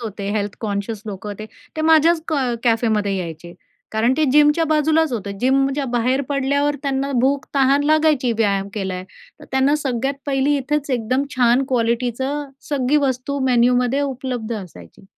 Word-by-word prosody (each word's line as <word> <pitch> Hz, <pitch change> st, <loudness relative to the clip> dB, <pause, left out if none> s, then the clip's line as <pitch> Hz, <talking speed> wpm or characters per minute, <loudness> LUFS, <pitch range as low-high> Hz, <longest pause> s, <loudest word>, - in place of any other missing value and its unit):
होते, 205 Hz, -3 st, -5 dB
health 205 Hz, 0 st, -2 dB
conscious 205 Hz, 0 st, -3 dB
लोकं 205 Hz, 0 st, -6 dB
होते. 210 Hz, +1 st, -7 dB, 0.3 s
ते 315 Hz, -, -2 dB
माझ्याच 320 Hz, +1 st, +4 dB
क 315 Hz, -, 0 dB, 0.3 s
कॅफेमध्ये 220 Hz, -4 st, +1 dB
यायचे. 170 Hz, -1 st, -6 dB, 0.4 s
कारण 225 Hz, +4 st, +2 dB
ते 310 Hz, -, +2 dB
जिमच्या 295 Hz, +2 st, +4 dB
बाजूलाच 310 Hz, -1 st, +2 dB
होतं. 200 Hz, -3 st, -4 dB
जिमच्या 270 Hz, +2 st, +1 dB
बाहेर 250 Hz, +3 st, +1 dB
पडल्यावर, 285 Hz, +1 st, 0 dB
त्यांना 275 Hz, 0 st, -1 dB
भूक-तहान 275 Hz, +1 st, +2 dB
लागायची 305 Hz, -6 st, +3 dB
व्यायाम 200 Hz, -3 st, +1 dB
केलाय, 190 Hz, -3 st, -4 dB, 0.4 s
तर -, -, -11 dB
त्यांना 265 Hz, +2 st, +2 dB
सगळ्यात 270 Hz, -2 st, -2 dB
पहिली 280 Hz, +1 st, +1 dB
इथेच 285 Hz, +1 st, -2 dB
एकदम 255 Hz, +2 st, 0 dB
छान 245 Hz, +1 st, +4 dB
क्वालिटीचं 250 Hz, +4 st, -1 dB, 0.2 s
सगळी 285 Hz, 0 st, +1 dB
वस्तू 260 Hz, +2 st, -2 dB
मेन्यूमध्ये 250 Hz, +2 st, +2 dB
उपलब्ध 255 Hz, -4 st, -3 dB
असायची. 175 Hz, -, -11 dB
255 Hz, 140 wpm, -20 LUFS, 220-280 Hz, 0.4 s, माझ्याच